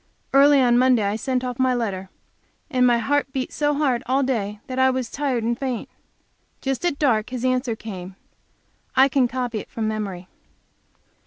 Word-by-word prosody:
Early 280 +1 +6
on 245 -2 +4
Monday 255 -3 +4
I 200 +1 0
sent 255 +3 -1
off 250 -1 -4
my 255 -1 +3
letter; 195 -5 -3 0.6
and 250 -2 +3
my 240 -1 +4
heart 280 +4 0
beat 265 -2 -3
so 295 -1 +1
hard 270 -5 +1
all 265 +2 +2
day 210 -6 -2
that 255 0 -4
I 260 0 +5
was 255 -2 -2
tired 270 -5 -1
and 235 +1 0
faint. 255 -2 -3 0.7
Just 270 +1 -3
at 345 -5 0
dark 230 -8 +1
his 255 -1 -4
answer 255 -2 0
came; 190 -4 -8 0.8
I 265 +1 +6
can 265 -2 +2
copy 245 -2 -3
it - - -10
from 220 -1 -3
memory. 200 -4 -4
250 Hz, 180 wpm, -23 LUFS, 225-265 Hz, 0.8 s, Early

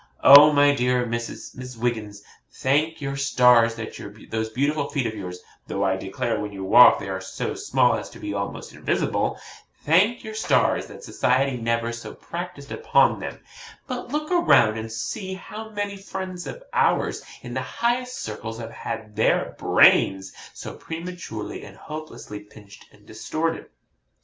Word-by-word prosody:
Oh, 145 +2 +10
my 145 0 +5
dear 125 -2 +1
Miss 120 +2 -6
Wiggins, 110 -4 -3 0.3
thank 150 +4 0
your 140 -1 -3
stars 125 -4 +4
that 110 -1 -7 0.4
those 110 0 -2
beautiful 140 +5 -1
feet 140 -4 -1
of 110 - -2
yours 90 -4 -7 0.2
though 100 - -2
I 95 -1 +2
declare 95 +4 -3
when 105 - -4
you 95 -1 -7
walk 115 +6 +8
they - - -7
are 95 -1 -4
so 95 - -4
small - - +2
as - - -4
to - - -13
be - - -5
almost - - -5
invisible - - -1 0.5
thank 190 +10 +3
your 220 - -7
stars 220 - +1
that - - -12
society 130 +1 +1
never 115 0 -1
so 120 0 -8
practised 170 -5 -7
upon 460 +1 +3
them; - - -7 0.4
but 250 -3 -5
look 300 +5 -3
around 340 - +4
and 110 0 -6
see 185 - -4
how 215 +3 -9
many 205 -2 -4
friends 190 -2 -6
of - - -8
ours - - +1 0.2
in - - -7
the - - -2
highest 250 +1 -1
circles 110 +1 -6
have 115 -1 -7
had 110 -2 -6
their 110 - +1
BRAINS 95 -1 +4 0.2
so - - -7
prematurely 165 -10 -7
and 100 -1 -12
hopelessly 155 -9 -8
pinched 105 0 -16
and - - -22
distorted. 165 +1 -3
125 Hz, 160 wpm, -24 LUFS, 110-175 Hz, 0.5 s, Oh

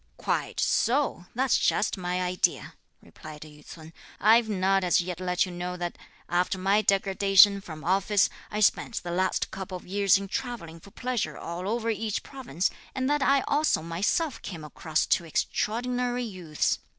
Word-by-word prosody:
"Quite - - -2
so; 240 -7 +1
that's 260 +1 +2
just 210 - +1
my 180 0 -2
idea!" 180 0 0 0.3
replied 155 -1 -12
Yü 150 -1 -13
ts'un; 160 +1 -12 0.3
"I've 225 +2 +5
not 195 -1 +2
as 180 -2 +3
yet 180 -1 -3
let 180 0 +1
you 185 - -8
know 180 +1 -5
that 175 -1 -4 0.3
after 180 +2 0
my 195 +3 +2
degradation 195 0 +4
from 155 -5 -9
office, 195 +3 +3 0.2
I 210 - -3
spent 220 +2 +1
the 175 - -5
last 185 +2 0
couple 190 -1 -6
of - - -15
years 200 0 +3
in 200 0 -6
travelling 210 -9 -5
for 200 - -15
pleasure 245 +2 -3
all 175 +3 -5
over 230 0 0
each 220 -1 -3
province, 235 - -3 0.2
and 260 -1 -1
that 295 -1 +1
I 275 0 +4
also 290 - +1
myself 200 - -1
came 165 -5 -7
across 155 +1 -1
two 170 - +2
extraordinary 245 +8 -1
youths. 180 -9 -2
195 Hz, 165 wpm, -27 LUFS, 175-225 Hz, 0.3 s, I've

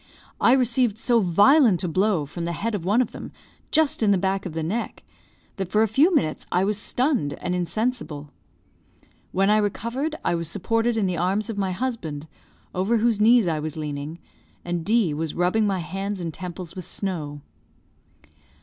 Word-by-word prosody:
I 240 - +5
received 245 -4 +2
so 235 +1 +3
violent 205 - +4
a - - 0
blow 185 -2 +1
from 170 +4 -6
the 170 - -2
head 225 +7 -3
of 200 -5 -3
one 210 +8 +3
of 230 - -8
them, - - -8 0.4
just 315 -5 +2
in 215 - +3
the 200 - +4
back 190 +1 -1
of 170 - -8
the 160 0 -3
neck, 210 +9 -3 0.5
that 190 -2 -3
for 215 +3 +3
a - - +2
few 280 - +4
minutes 155 - 0
I 180 - +2
was 205 +1 0
stunned 245 - 0
and 180 - -4
insensible. 180 - -2 1.0
When 195 +2 +2
I 215 - +5
recovered, 235 +9 -2
I - - +2
was 170 -2 -2
supported 225 +4 0
in 210 - +1
the 180 -2 -1
arms 195 +5 0
of 210 - -7
my 190 -1 0
husband, 180 - -4 0.5
over 195 +6 +1
whose 225 -1 +1
knees 230 -2 +5
I 160 -2 0
was 155 +1 -5
leaning, 150 +1 -5 0.5
and 175 -1 -2
D 210 -5 +2
was 155 0 -3
rubbing 185 +5 +2
my 195 -1 0
hands 195 +3 -4
and 165 -2 -4
temples 180 -1 -7
with 185 -3 -7
snow. 155 -7 -4
195 Hz, 185 wpm, -24 LUFS, 170-225 Hz, 1.0 s, I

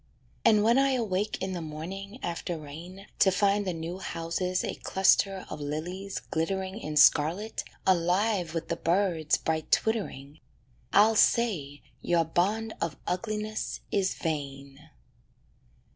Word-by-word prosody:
And 215 -2 +5
when 235 +4 +4
I 275 0 +3
awake 210 -4 -1
in 190 0 -2
the 175 - -4
morning, 185 +7 -7
after 170 0 -3
rain, 165 +6 -10
To 195 - +6
find 200 +1 +2
the - - +1
new 165 +3 -5
houses 180 +1 -2
a - - -2
cluster 190 0 +2
of - - -7
lilies 175 +7 -4
glittering 190 +5 -2
In 150 -7 -4
scarlet, 165 +9 +4 0.2
alive 180 0 +2
with 165 - -3
the - - -1
birds' 170 -3 +1
bright 160 -1 -2
twittering, 155 -10 -1 0.5
I'll 215 +3 +5
say 170 -13 +2 0.2
your 170 -1 +2
bond 210 +7 0
of 165 -3 -2
ugliness 215 +3 -3
is 190 -2 +1
vain. 140 -1 -5
185 Hz, 130 wpm, -28 LUFS, 160-205 Hz, 0.5 s, To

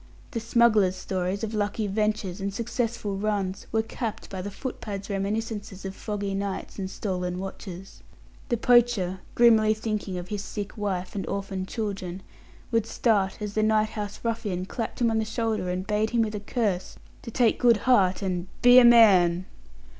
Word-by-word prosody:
The 235 - -2
smuggler's 220 -4 +3
stories 185 +2 -3
of 220 0 -3
lucky 210 +1 -1
ventures 205 -2 -1
and 200 +1 -2
successful 225 -1 -2
runs 200 -2 -2
were 220 0 +1
capped 225 0 -5
by 190 -1 -4
the 200 - -5
footpad's 205 -2 -6
reminiscences 205 0 -3
of 190 - -4
foggy 205 -2 -3
nights 200 +1 -4
and 190 -1 -3
stolen 180 -3 -3
watches. 190 0 -8 0.5
The 240 - +1
poacher, 230 -6 +3 0.2
grimly 220 -2 +5
thinking 215 -4 -3
of 180 0 -6
his 205 -1 -3
sick 205 0 -6
wife 190 -4 -3
and 195 - -4
orphaned 195 -1 -3
children, 195 -5 -4 0.5
would 230 -2 +1
start 210 -4 +1
as 205 -1 -4
the 215 - +1
night 215 0 +3
house 210 -2 -5
ruffian 215 -6 -2
clapped 230 +5 -5
him 230 -1 +3
on 220 - +1
the - - +1
shoulder 220 -3 -2
and 180 +1 -2
bade 210 +1 0
him, 235 0 +2
with 215 -1 -3
a 210 - -3
curse, 205 -4 -2 0.3
to - - -8
take 230 0 +2
good 235 -3 +5
heart 200 -7 +3
and 180 -1 -2 0.2
"be 245 +1 +9
a - - +7
man." 190 -7 +6
205 Hz, 175 wpm, -26 LUFS, 190-225 Hz, 0.5 s, be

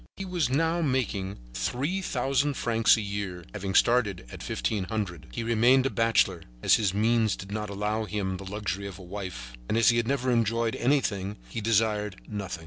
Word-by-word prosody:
He 195 - -4
was 175 -7 0
now 165 +5 +1
making 110 - -1 0.2
three 135 - -1
thousand 140 -4 0
francs 115 -2 +3
a - - -1
year, 100 -4 -4
having 100 -2 -4
started 110 - +3
at - - -9
fifteen 100 -4 -2
hundred. 100 -7 -4
He 115 - -4
had 115 - -4
remained 120 +3 +5
a 135 - +1
bachelor, 115 -6 +2 0.2
as - - +5
his 105 -4 +3
means 110 +1 +2
did 95 +1 -9
not 105 0 -3
allow 105 +2 -1
him 100 -3 -2
the 95 - -9
luxury 100 -1 -3
of 95 -2 -8
a 95 - -11
wife, 90 -11 -7 0.2
and 110 - +1
as 115 - +6
he 120 - +3
had 120 -1 +1
never 130 -1 +1
enjoyed 115 0 +1
anything, 105 -7 0
he 115 - -4
desired 105 -2 +1
nothing. 100 -5 -5
110 Hz, 195 wpm, -27 LUFS, 100-120 Hz, 0.2 s, as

